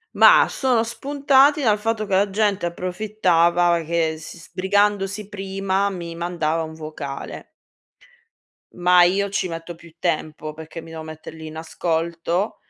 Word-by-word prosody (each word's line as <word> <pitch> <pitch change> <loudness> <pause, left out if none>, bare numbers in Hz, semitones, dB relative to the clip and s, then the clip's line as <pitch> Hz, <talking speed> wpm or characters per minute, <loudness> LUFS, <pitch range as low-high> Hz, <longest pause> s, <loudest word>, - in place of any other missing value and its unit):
Mah, - - +7
sono 250 -4 +1
spuntati 280 +4 +3
dal 215 -4 +3
fatto 220 0 -1
che 190 - +1
la 200 +1 +3
gente 205 -2 0
approfittava 175 -2 +1
che 160 -1 0
s 160 - -10
sbrigandosi 195 +3 0
prima 195 0 -1
mi 170 -2 -6
mandava 165 -2 -1
un 160 0 -7
vocale. 155 -3 -7 1.3
Ma 180 0 +6
io 200 +3 +1
ci 195 -2 -1
metto 165 +1 -6
più 170 -1 -16
tempo, 155 -2 -2
perché 160 +1 -9
mi 165 - -13
devo 160 -1 -7
mettere 155 0 -10
lì 160 0 -9
in 155 0 -9
ascolto, 165 +3 -2
175 Hz, 140 wpm, -22 LUFS, 165-205 Hz, 1.3 s, Mah